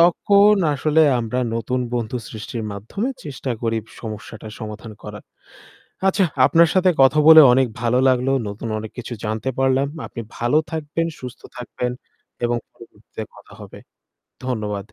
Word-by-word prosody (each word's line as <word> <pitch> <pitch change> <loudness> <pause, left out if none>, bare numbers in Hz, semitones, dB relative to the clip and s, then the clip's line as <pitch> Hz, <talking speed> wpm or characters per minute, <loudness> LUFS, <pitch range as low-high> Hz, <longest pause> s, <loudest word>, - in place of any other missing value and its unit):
তখন 200 +4 +5 0.2
আসলে 155 +3 +2 0.2
আমরা 115 +2 -3 0.2
নতুন 125 +2 -2
বন্ধু 120 0 -2
সৃষ্টির 110 +1 -6
মাধ্যমে 115 - -4 0.2
চেষ্টা 140 -3 -5
করি 115 -1 0 0.2
সমস্যাটা 110 0 -8
সমাধান 110 +1 -7
করার। - - -9 0.8
আচ্ছা 195 0 +2 0.2
আপনার 165 +3 +5
সাথে 185 -1 +4
কথা 135 +3 +5
বলে 160 0 +11
অনেক 130 +1 +3
ভালো 120 +1 +1
লাগলো 130 0 +2 0.2
নতুন 100 +3 -6
অনেক 110 0 -7
কিছু 125 0 -5
জানতে 110 +4 -2
পারলাম। 135 +1 +2 0.2
আপনি 115 - -8 0.2
ভালো 120 +6 +2
থাকবেন 160 +1 -2
সুস্থ 125 -2 -9 0.2
থাকবেন 125 0 -4 0.5
এবং 120 0 +1 0.2
পরবর্তীতে 110 -1 -11
কথা - - -17
হবে। - - -11 0.7
ধন্যবাদ। 105 -4 -4
125 Hz, 140 wpm, -21 LUFS, 110-150 Hz, 0.8 s, বলে